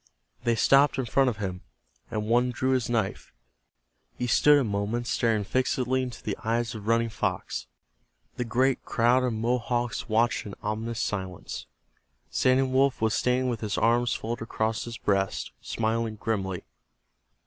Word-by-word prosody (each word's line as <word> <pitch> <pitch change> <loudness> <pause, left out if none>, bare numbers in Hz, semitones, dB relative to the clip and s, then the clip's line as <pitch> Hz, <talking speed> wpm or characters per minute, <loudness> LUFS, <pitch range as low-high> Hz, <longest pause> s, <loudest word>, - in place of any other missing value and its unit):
They 120 -1 +3
stopped 140 +6 +4
in 130 - 0
front 135 +2 +3
of 115 - -4
him, 95 -3 -4 0.5
and 105 0 -2
one 120 +3 +3
drew 130 +2 0
his 130 -3 +1
knife. 110 -5 -1 0.9
He 125 - -1
stood 145 +5 +5
a 140 - +2
moment 105 +2 -1
staring 115 -3 +1
fixedly 130 +3 0
into 125 -2 -6
the 105 - -2
eyes 115 0 0
of 110 -2 -8
Running 115 0 +2
Fox. - - -3 0.7
The 125 - -2
great 125 +3 +1
crowd 120 +2 +3
of 125 - +1
Mohawks 120 +1 -1
watched 115 0 +1
in 100 - -7
ominous 110 +2 -3
silence. 95 -4 -4 0.6
Standing 130 0 +2
Wolf 135 0 +3
was 110 -1 +1
standing 125 +1 +1
with 120 -3 -2
his 105 -3 -2
arms 120 +1 +2
folded 115 +1 -4
across 110 -1 -1
his 120 0 -6
breast, 100 -3 0
smiling 115 0 -1
grimly. 95 -4 -2
115 Hz, 155 wpm, -27 LUFS, 110-125 Hz, 0.9 s, stood